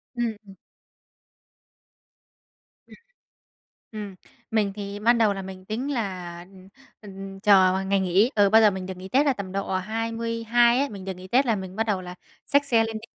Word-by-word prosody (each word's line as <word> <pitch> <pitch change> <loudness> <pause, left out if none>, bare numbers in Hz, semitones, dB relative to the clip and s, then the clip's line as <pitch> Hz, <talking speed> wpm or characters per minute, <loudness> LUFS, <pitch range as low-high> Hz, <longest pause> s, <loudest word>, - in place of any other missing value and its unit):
Ừm, 235 -2 -1
ừm. 195 - -13 2.3
Ừm. - - -15 1.0
Ừm, 210 -3 -7 0.4
mình 210 -3 +1
thì 200 -1 -6
ban 235 +3 +3
đầu 220 -3 +3
là 195 - -5
mình 190 -1 -10
tính 240 +8 -3
là, 185 -7 -4
ừm, 190 -1 -16 0.3
ừm, 195 -1 -9
chờ 190 -2 +4
ngày 195 0 +2
nghỉ. 190 +6 +2
Ừ, 205 -2 +4
bao 220 +2 +6
giờ 215 -2 +6
mình 190 -1 -5
được 185 0 -7
nghỉ 185 +1 -9
Tết 275 +8 +3
là 280 - +3
tầm 200 -5 -7
độ 195 0 -2
22 230 +3 +1
ấy, 280 +1 0
mình 195 -4 -9
được 190 - -3
nghỉ 185 +1 -11
Tết 255 +8 +3
là 230 -3 +2
mình 190 -2 -7
bắt 220 - +1
đầu 200 -3 0
là 180 0 -9 0.3
xách 285 0 +2
xe 235 -5 +3
lên 225 0 -4
đi. 220 - -13
205 Hz, 190 wpm, -25 LUFS, 190-230 Hz, 2.3 s, bao